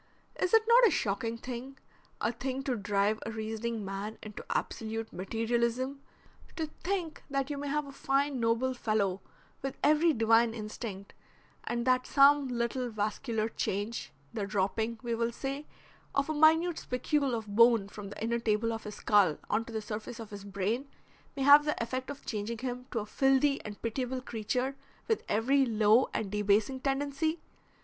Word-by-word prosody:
Is 365 - +1
it 450 -1 +6
not 475 +1 +7
a - - +4
shocking 225 - -1
thing 255 +3 -7 0.4
a - - +1
thing 260 +3 -4
to 265 -2 0
drive 205 0 +1
a - - -4
reasoning 220 0 -3
man 195 +3 -5
into 215 -1 -8
absolute 225 0 -3
Materialism 235 +7 -1 0.5
to 315 -2 -3
think 355 -4 -2
that 275 +1 -1
you 285 - -3
may 285 - -4
have 300 +1 0
a 280 - -9
fine, 275 0 0
noble 230 +3 +1
fellow 210 -5 0 0.4
with 270 -1 -4
every 310 +3 +5
divine 225 -2 +3
instinct 210 -2 -6 0.5
and 235 0 -2
that 255 0 +2
some 280 0 +6
little 245 +1 -1
vascular 215 +1 -1
change, 210 0 -3 0.2
the 210 -4 -2
dropping, 215 +3 -1
we 235 -1 -1
will 230 +1 0
say, 275 +4 -5 0.5
of 280 +3 +1
a - - 0
minute 320 +3 +4
spicule 260 +1 0
of 225 -1 -4
bone 230 -3 +6
from 200 0 -8
the 205 - -7
inner 235 +1 0
table 225 0 +1
of 225 - -6
his 210 0 -6
skull 200 -8 +3
on 220 +2 +1
to 235 - -9
the 220 -1 -3
surface 215 +2 -6
of 225 -2 -8
his 200 -1 -8
brain 200 +7 -2 0.5
may 275 - -1
have 285 +2 +9
the 300 0 -1
effect 255 +3 -3
of 285 0 -8
changing 215 +1 -3
him 250 +1 -5
to - - -4
a 210 - -1
filthy 270 +4 +2
and 210 -1 -8
pitiable 250 +3 -2
creature 250 +3 -2 0.3
with 445 - +1
every 265 +6 +3
low 220 0 +4
and 200 -3 -3
debasing 210 +5 +2
tendency? 285 +4 -1
235 Hz, 170 wpm, -31 LUFS, 215-275 Hz, 0.5 s, have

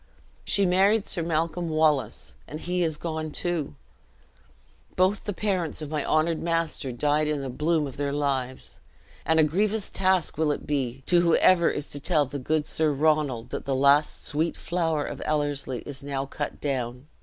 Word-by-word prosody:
She 200 - +2
married 195 +4 +3
Sir 175 - -3
Malcolm 165 +1 -1
Wallace, 150 - +1
and 155 - -7
he 180 +1 -1
is 160 -2 -1
gone 160 -1 -4
too! 160 - -2 1.2
Both 185 +3 +2
the 205 - -1
parents 185 -5 -2
of 155 -1 -6
my 150 -2 -1
honored 155 +1 +1
master 165 -5 -1
died 150 +5 +1
in 150 -2 -1
the 135 -2 -4
bloom 155 +3 +1
of 135 - -8
their 140 0 -1
lives; 135 -3 -2 0.5
and 160 +1 +4
a - - +7
grievous 205 +7 0
task 185 -5 +1
will 155 -2 +2
it - - -4
be 135 -3 -2
to 175 -1 +4
whoever 170 +1 +4
is 145 - -4
to 145 - -3
tell 150 0 +2
the 140 +2 -6
good 150 +3 0
Sir 155 0 0
Ronald 145 -5 +1
that - - -4
the 135 0 0
last 140 +3 +3
sweet 160 +3 -1
flower 165 -4 -1
of - - -6
Ellerslie 145 -4 -1
is 140 -2 -8
now 140 -1 -3
cut 145 +2 -5
down! 125 -2 -3
155 Hz, 180 wpm, -26 LUFS, 140-170 Hz, 1.2 s, a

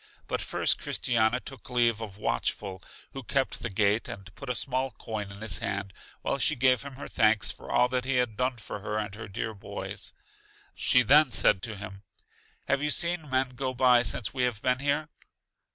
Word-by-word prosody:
But - - -2
first - - +1
Christiana 115 0 +1
took 135 0 -10
leave 120 -3 +2
of 100 -3 -7
Watchful, 95 -2 -2 0.3
who 135 - -6
kept 135 +2 -1
the 115 - -3
gate, 105 +3 +2
and 100 -4 -8
put 140 +5 -9
a 125 - 0
small 130 +2 -1
coin 105 -3 -6
in 100 +1 -11
his 105 -4 +1
hand 100 -1 -3 0.3
while 140 - -1
she 155 - +2
gave 130 -2 +3
him 140 -1 -8
her 140 - -7
thanks 110 -3 +3
for - - -10
all 125 - +4
that 125 0 -1
he 135 0 0
had 125 -4 +1
done 125 +2 0
for 110 - -7
her 105 +1 -3
and 105 -2 -3
her 110 +1 -8
dear 110 +2 -4
boys. 100 - -5 0.6
She 125 - +4
then 145 +4 +6
said 95 -5 +3
to 110 +1 -4
him, 100 -1 -8 0.7
Have 140 0 +1
you 150 - 0
seen 170 -1 +2
men 130 0 +1
go 130 0 -4
by 125 -1 +5
since 115 -1 0
we 130 - -2
have 125 -4 0
been 125 0 +2
here? 145 +2 0
125 Hz, 200 wpm, -28 LUFS, 105-130 Hz, 0.7 s, then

